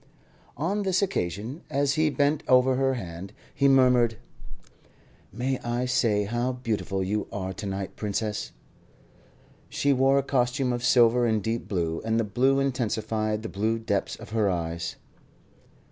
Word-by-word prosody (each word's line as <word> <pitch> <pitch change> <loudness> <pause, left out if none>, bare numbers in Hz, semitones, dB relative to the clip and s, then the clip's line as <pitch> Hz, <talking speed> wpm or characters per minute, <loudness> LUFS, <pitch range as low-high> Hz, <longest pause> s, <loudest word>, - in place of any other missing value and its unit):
On 185 +9 -1
this 190 0 +1
occasion, 115 - -3
as 140 -1 +1
he 155 0 +2
bent 145 +1 +1
over 130 0 +5
her 135 0 +1
hand, 95 -2 -7 0.2
he 140 - +2
murmured: 125 -4 +4 1.1
"May 125 +5 -2
I 120 +1 -2
say 110 -4 +2
how 120 +5 -1
beautiful 110 -6 -2
you 105 +3 -2
are 95 -1 -4
to 100 +2 -6
night, 95 0 -4
Princess?" 105 0 -3 1.2
She 140 0 +1
wore 135 +1 +3
a 140 - +2
costume 125 -1 0
of 120 0 -3
silver 120 -1 +4
and 110 -3 0
deep 115 +2 -2
blue, 85 -4 -2
and 110 +1 +1
the - - +2
blue 130 +6 +2
intensified 110 -4 -1
the - - -4
blue 110 +4 0
depths 105 -3 -2
of - - -12
her 110 -3 +2
eyes. 85 -2 -3
120 Hz, 150 wpm, -26 LUFS, 105-135 Hz, 1.2 s, over